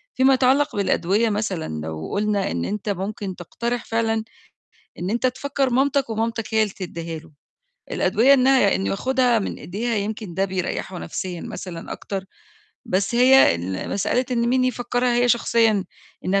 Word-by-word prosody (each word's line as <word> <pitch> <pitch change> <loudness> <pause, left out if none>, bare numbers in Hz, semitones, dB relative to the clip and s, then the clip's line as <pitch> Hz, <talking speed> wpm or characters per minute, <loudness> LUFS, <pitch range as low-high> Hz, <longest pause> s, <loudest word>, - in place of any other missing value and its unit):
فيما 265 +1 +5
يتعلق 265 +2 +3
بالأدوية 200 +2 +1
مثلًا 190 - -2
لو 80 0 -5
قُلنا 205 -1 0
إن - - -2
أنت 210 +1 -3
ممكن 195 0 -3
تقترح 235 +7 -4
فعلًا 225 -1 0 0.8
إن 180 +3 -3
أنت 235 +3 +1
تفكر 270 +1 -1
مامتك 275 0 +1
ومامتك 225 0 -2
هي 220 - +5
اللي 205 -3 -2
تدّيها 170 -3 -5
له، 165 -1 -18 0.6
الأدوية 250 +6 +4
إنها 260 -5 +4
إنه 195 - -1
ياخدها 250 +2 +2
من 200 - -4
إيديها 225 +6 -3
يمكن 210 -2 -3
ده 195 +3 +1
بيريّحه 185 0 -3
نفسيًا 180 -3 -5
مثلًا 170 -3 -7
أكتر، 195 -1 -5 0.6
بس 195 +5 0
هي 255 - +6
ال 90 +3 -4
مسألة 245 +6 +1
إن 235 -1 +1
مين 255 +1 +2
يفكّرها 245 0 0
هي 245 0 +3
شخصيًا 230 -4 +3 0.4
إنها 195 +2 +2
220 Hz, 155 wpm, -22 LUFS, 190-245 Hz, 0.8 s, هي